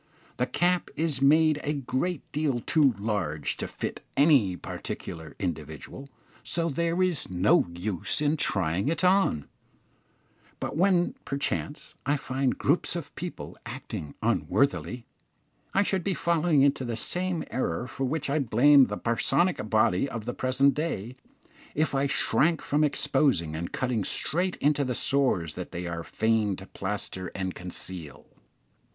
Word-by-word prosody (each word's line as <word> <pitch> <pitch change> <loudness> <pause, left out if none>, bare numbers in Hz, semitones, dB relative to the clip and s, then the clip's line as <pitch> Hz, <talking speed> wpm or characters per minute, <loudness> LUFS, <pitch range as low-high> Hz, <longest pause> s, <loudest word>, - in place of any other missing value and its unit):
The 125 - +1
cap 180 0 +1
is 155 -4 -1
made 155 +2 +5
a 150 - 0
great 145 +4 -2
deal 145 -5 0
too 140 -5 +3
large 100 -8 -2
to - - -3
fit - - -5 0.2
any 135 - +5
particular 80 0 -7
individual, 80 - -5 0.3
so 165 +9 -1
there 170 +4 +1
is 180 -5 0
no 90 +1 +3
use 90 - -2
in 150 +1 +2
trying 95 - 0
it 165 +4 0
on; 185 - +3 1.1
but - - -4
when, 180 +1 +3
perchance, 140 +1 -3
I 145 +2 +1
find 130 -1 -1
groups 155 +4 +1
of 150 -5 -5
people 180 +1 -7
acting 75 - -7
unworthily, 115 - +1 0.7
I 195 - +3
should 190 -2 0
be 195 0 0
falling 165 -4 +3
into 140 -2 +2
the 120 -2 -3
same 180 +6 -2
error 120 -4 -1
for 135 +1 -3
which 145 +2 -1
I 145 +2 +1
blame 135 +2 +6
the - - -4
parsonic 115 +3 +1
body 110 +2 +3
of 115 -5 -5
the 120 - -3
present 130 +3 +2
day, 130 -7 -3 0.6
if 155 0 +1
I 135 +1 +2
shrank 155 +3 +2
from 150 +2 +1
exposing 135 - +1
and 85 +2 -4
cutting 125 -5 -1
straight 180 - 0
into 145 0 +2
the 125 -2 -2
sores 125 - +1
that - - -6
they 90 +1 -5
are 85 -1 -4
fain 110 -1 +1
to 95 - -10
plaster 95 -2 -5
and 95 -1 -2
conceal. 90 -3 -8
135 Hz, 145 wpm, -27 LUFS, 100-155 Hz, 1.1 s, blame